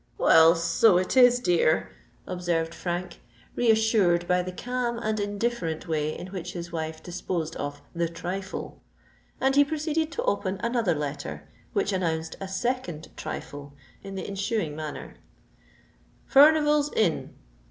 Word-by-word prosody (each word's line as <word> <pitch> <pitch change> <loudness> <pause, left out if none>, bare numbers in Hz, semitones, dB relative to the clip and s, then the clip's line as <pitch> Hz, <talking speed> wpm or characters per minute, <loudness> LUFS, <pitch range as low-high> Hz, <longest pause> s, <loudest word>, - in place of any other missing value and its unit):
"Well, 165 +1 +6
so 165 +4 +4
it 185 +6 -1
is, 245 -1 +7
dear," 175 -6 +2 0.3
observed 170 -2 -2
Frank, 175 0 -4 0.3
reassured 220 -7 +3
by 180 0 +3
the 185 +1 -5
calm 245 +4 -2
and 215 -2 -2
indifferent 205 -5 -2
way 155 -1 -1
in - - -7
which 180 -1 -5
his 170 -1 -6
wife 160 -1 -4
disposed 170 -2 -4
of 145 0 -5
the 170 -1 -1
trifle: 180 +3 -6 0.6
and 270 +1 +2
he 285 - +7
proceeded 315 +2 -1
to - - -2
open 195 -1 -1
another 235 -7 +1
letter, 145 -1 -5 0.3
which 400 - 0
announced 165 -3 -1
a 195 - -4
second 195 -5 -3
trifle 145 0 -7 0.3
in 195 0 -8
the 190 - -5
ensuing 200 -5 -2
manner:— 155 -1 -7 1.2
_Furnival's 295 0 +6
Inn. 190 -7 0
185 Hz, 135 wpm, -26 LUFS, 165-235 Hz, 1.2 s, is